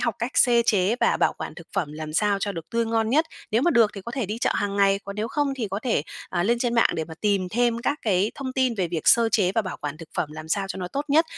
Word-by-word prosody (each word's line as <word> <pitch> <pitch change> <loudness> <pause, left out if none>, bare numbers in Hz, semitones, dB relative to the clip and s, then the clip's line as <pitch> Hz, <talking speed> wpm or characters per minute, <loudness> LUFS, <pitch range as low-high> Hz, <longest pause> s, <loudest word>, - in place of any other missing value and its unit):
học 235 -4 0
cách 235 +3 -2
xê 240 -2 +5
chế 205 +3 +2
và - - +3
bảo - - +2
quản - - -6
thực - - -12
phẩm 150 -2 -1
làm 155 0 -6
sao 205 +3 +2
cho 200 0 -1
được 165 -3 -8
tươi 230 0 +1
ngon 225 0 0
nhất. 315 +5 +3 0.2
Nếu 230 +4 +2
mà 345 - +3
được 230 -6 +4
thì 195 - -6
có 235 +5 -8
thể 255 -7 -2
đi 215 +3 -4
chợ - - +1
hàng 200 0 -1
ngày, 195 0 +4
còn 200 +1 -7
nếu 220 +2 -2
không 290 0 0
thì 225 -5 -3
có 200 - -2
thể, 230 - +1 0.3
à, 175 -1 -1
lên 235 +4 +2
trên 240 -1 0
mạng 230 - +4
để 160 - -2
mà 160 - -10
tìm 200 -3 +1
thêm 235 +1 +1
các 285 +5 -1
cái 200 0 +2
thông 260 -2 -5
tin 255 -3 +1
về 185 -4 -1
việc 165 -1 -2
sơ 230 -1 +5
chế 195 -4 +2
và 225 - +2
bảo 185 - -5
quản 145 0 -4
thực 165 -1 -11
phẩm 155 - -1
làm 155 0 -9
sao 195 +3 0
cho - - -4
nó 180 - -4
tốt 280 +9 -3
nhất, 315 +4 +4
215 Hz, 310 wpm, -24 LUFS, 185-235 Hz, 0.3 s, xê